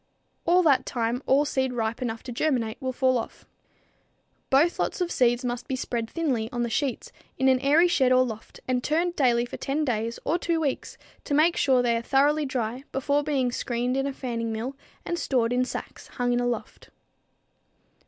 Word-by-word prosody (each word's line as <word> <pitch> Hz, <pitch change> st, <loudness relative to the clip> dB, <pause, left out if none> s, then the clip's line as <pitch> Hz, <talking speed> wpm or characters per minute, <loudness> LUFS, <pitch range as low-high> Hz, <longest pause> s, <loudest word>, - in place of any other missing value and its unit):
At 360 Hz, +2 st, +5 dB
that 280 Hz, -5 st, +4 dB
time 240 Hz, 0 st, -1 dB
all 280 Hz, +3 st, +4 dB
seed 265 Hz, -3 st, -1 dB
ripe 225 Hz, 0 st, -2 dB
enough 225 Hz, -2 st, -3 dB
to 250 Hz, -, -7 dB
germinate 240 Hz, -3 st, -1 dB
will 260 Hz, -1 st, -1 dB
fall 255 Hz, -1 st, +2 dB
off. 225 Hz, -, -8 dB, 1.0 s
Both 300 Hz, +6 st, +3 dB
lots -, -, -1 dB
of 355 Hz, -1 st, -1 dB
seed 240 Hz, 0 st, +2 dB
must 245 Hz, 0 st, -3 dB
be 265 Hz, -, -1 dB
spread 235 Hz, -3 st, -3 dB
thinly 260 Hz, -10 st, -1 dB
on 240 Hz, -1 st, -1 dB
the 235 Hz, -, -2 dB
sheets 270 Hz, 0 st, -2 dB, 0.3 s
in 265 Hz, -, +2 dB
an 260 Hz, -1 st, +4 dB
airy 295 Hz, +6 st, +4 dB
shed 270 Hz, -7 st, +3 dB
or 255 Hz, 0 st, +6 dB
loft 220 Hz, -3 st, -8 dB
and 250 Hz, -1 st, 0 dB
turned 340 Hz, +3 st, 0 dB
daily 240 Hz, -3 st, +3 dB
for -, -, -8 dB
10 295 Hz, +3 st, -1 dB
days 230 Hz, -2 st, -1 dB
or 330 Hz, +4 st, +1 dB
two 335 Hz, -2 st, 0 dB
weeks 285 Hz, -4 st, -3 dB, 0.3 s
to 285 Hz, -, 0 dB
make 325 Hz, +4 st, +4 dB
sure 260 Hz, -3 st, +3 dB
they 235 Hz, -1 st, +2 dB
are -, -, -2 dB
thoroughly 285 Hz, +4 st, +2 dB
dry 250 Hz, 0 st, -3 dB
before 285 Hz, +2 st, 0 dB
being 270 Hz, -4 st, 0 dB
screened 245 Hz, +1 st, -1 dB
in 270 Hz, +1 st, 0 dB
a -, -, -2 dB
fanning 230 Hz, -4 st, -3 dB
mill 235 Hz, +5 st, -4 dB, 0.3 s
and 345 Hz, -, -2 dB
stored 245 Hz, -3 st, +1 dB
in 250 Hz, 0 st, +2 dB
sacks 255 Hz, -, -7 dB
hung 245 Hz, 0 st, -1 dB
in 245 Hz, -, +1 dB
a 245 Hz, -, 0 dB
loft. 240 Hz, -, -5 dB
255 Hz, 200 wpm, -26 LUFS, 240-285 Hz, 1.0 s, or